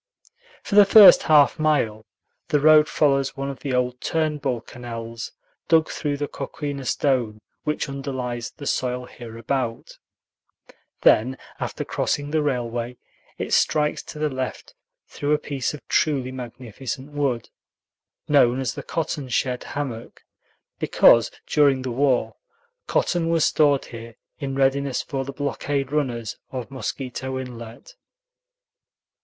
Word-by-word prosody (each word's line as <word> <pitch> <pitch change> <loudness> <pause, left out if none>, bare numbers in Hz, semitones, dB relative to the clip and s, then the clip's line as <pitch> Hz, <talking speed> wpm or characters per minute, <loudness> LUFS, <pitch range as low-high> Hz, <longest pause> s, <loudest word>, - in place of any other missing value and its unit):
For - - -6
the 205 0 +9
first 215 +6 +9
half 150 - +4
mile 115 -9 +1 0.4
the 150 - +2
road 155 +1 +6
follows 140 -2 +1
one 135 0 -3
of 135 - -10
the 135 -3 -2
old 125 0 -1
Turnbull 150 -6 -1
canals 115 -2 -7 0.4
dug 160 -1 +3
through 145 -2 -2
the 145 0 -2
coquina 140 -3 -5
stone 125 -7 0 0.3
which 150 0 -1
underlies 130 -4 -4
the 145 - -11
soil 125 -2 -1
hereabout; 115 0 -5 1.0
then, 130 +5 +4 0.2
after - - -4
crossing 145 0 -2
the 155 0 +2
railway, 120 -3 -2 0.4
it - - -3
strikes 150 -1 +2
to - - -9
the 150 0 0
left 130 -1 -5 0.3
through 145 +1 -1
a - - +4
piece 140 -3 -3
of 150 - -11
truly 135 -5 +1
magnificent 130 +2 -7
wood, 140 -5 -2 0.8
known 130 -4 +4
as 130 -4 -2
the - - -6
cotton 150 -4 -3
shed 125 +1 -1
hammock, 125 -5 -6 0.6
because, - - +5 0.2
during 140 -3 +3
the 130 - -3
war, 130 0 +1 0.5
cotton 170 -2 +1
was 165 -2 +3
stored 145 -3 +3
here 115 -1 -10 0.2
in 135 -2 -3
readiness 135 0 +1
for 135 -1 -3
the 140 - -6
blockade 140 0 -2
runners 125 -7 -2
of 130 -1 -6
Mosquito 130 +1 -4
Inlet. 120 -3 -9
135 Hz, 130 wpm, -23 LUFS, 125-145 Hz, 1.0 s, the